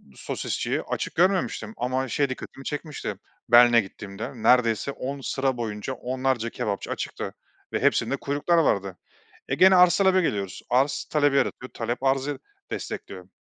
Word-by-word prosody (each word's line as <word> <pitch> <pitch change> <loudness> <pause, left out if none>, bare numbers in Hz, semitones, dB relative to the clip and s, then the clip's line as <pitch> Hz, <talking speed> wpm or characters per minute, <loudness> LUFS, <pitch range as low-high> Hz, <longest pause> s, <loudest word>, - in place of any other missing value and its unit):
sosisçiyi - - -3
açık - - -4
görmemiştim 190 +4 +1
ama 130 +2 -1
şey 140 +3 0
dikkatimi 135 +1 -8
çekmişti; 150 0 -4 0.4
Berlin'e 120 0 +7
gittiğimde 100 +2 -8
neredeyse 125 +1 +3
10 140 +1 -5
sıra 135 -1 -1
boyunca 110 +1 -4
onlarca 130 -2 -1
kebapçı 105 -5 -3
açıktı - - -4 0.4
ve - - +1
hepsinde - - +2
kuyruklar 145 +5 0
vardı. 100 - +1 0.5
E, - - +1
gene 190 0 +6
arz-talebe 185 +1 +5
geliyoruz. 100 - -2
Arz, 130 +4 +2
talebi 145 -2 +3
yaratıyor. 130 -2 -1
Talep, 120 +2 -3
arzı 135 +1 0 0.3
destekliyor. - - -6
130 Hz, 135 wpm, -25 LUFS, 115-145 Hz, 0.5 s, Berlin'e